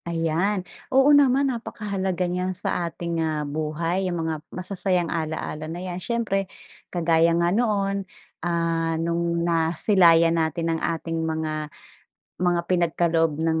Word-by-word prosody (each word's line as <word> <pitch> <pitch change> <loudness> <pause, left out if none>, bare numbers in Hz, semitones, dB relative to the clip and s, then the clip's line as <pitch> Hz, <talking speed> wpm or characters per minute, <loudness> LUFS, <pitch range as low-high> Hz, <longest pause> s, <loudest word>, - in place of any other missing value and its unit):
Ayan, 170 +4 0 0.2
oo 270 +2 +5
naman 275 -1 +4
napakahalaga 195 -5 -3
niyan 180 +1 -2
sa 175 -2 -1
ating, 170 0 -3
ah, 155 -2 -1
buhay 160 +5 -2
yung 170 -2 -2
mga 160 -2 -3
masasayang 185 -2 -1
alaala 155 -1 -3
na 165 - -5
yan. 180 0 -5
Siyempre 195 -4 -1 0.4
kagaya 165 -1 +3
nga 170 +1 +2
noon, 200 -4 0 0.3
ah, 165 -1 0
nung 170 +1 0
nasilayan 165 0 +4
natin 165 +1 -1
ang 160 - -3
ating 165 0 -2
mga, 155 -1 -2 0.7
mga 175 -1 +2
pinagkaloob 165 -2 +1
ng 160 0 +1
170 Hz, 130 wpm, -24 LUFS, 165-185 Hz, 0.7 s, oo